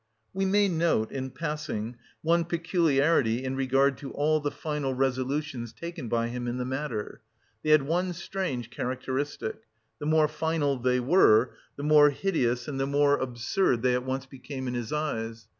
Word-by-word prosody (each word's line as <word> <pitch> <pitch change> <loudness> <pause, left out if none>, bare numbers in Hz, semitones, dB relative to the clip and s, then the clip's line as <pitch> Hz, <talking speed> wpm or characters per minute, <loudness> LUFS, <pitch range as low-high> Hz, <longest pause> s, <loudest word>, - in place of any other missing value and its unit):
We 195 0 0
may 205 +1 +4
note 165 - +1
in 130 -1 -4
passing, 150 -7 -4 0.3
one 170 +1 +3
peculiarity 160 -7 +2
in 130 0 -2
regard 135 +1 +2
to 140 - -7
all 155 +2 +2
the 145 -1 -1
final 145 -3 -3
resolutions 130 -1 -1
taken 170 -6 -7
by 115 0 0
him 120 0 -4
in 120 +1 -2
the 125 - -2
matter; 130 -4 -4 0.4
they 155 - -2
had 155 -2 +6
one 175 +5 0
strange 170 - -4
characteristic: 130 0 -3 0.4
the 145 - -4
more 155 0 +4
final 150 -3 0
they 125 +1 +2
were, 125 - +5 0.2
the 140 - -7
more 150 0 +7
hideous 125 -7 0
and 140 -2 -4
the 135 - 0
more 145 0 +3
absurd 125 +2 0
they 125 -1 +3
at 125 0 0
once 130 +1 -3
became 135 0 -7
in 125 - -2
his 120 -2 -4
eyes. 115 -7 -3
135 Hz, 170 wpm, -28 LUFS, 125-155 Hz, 0.4 s, more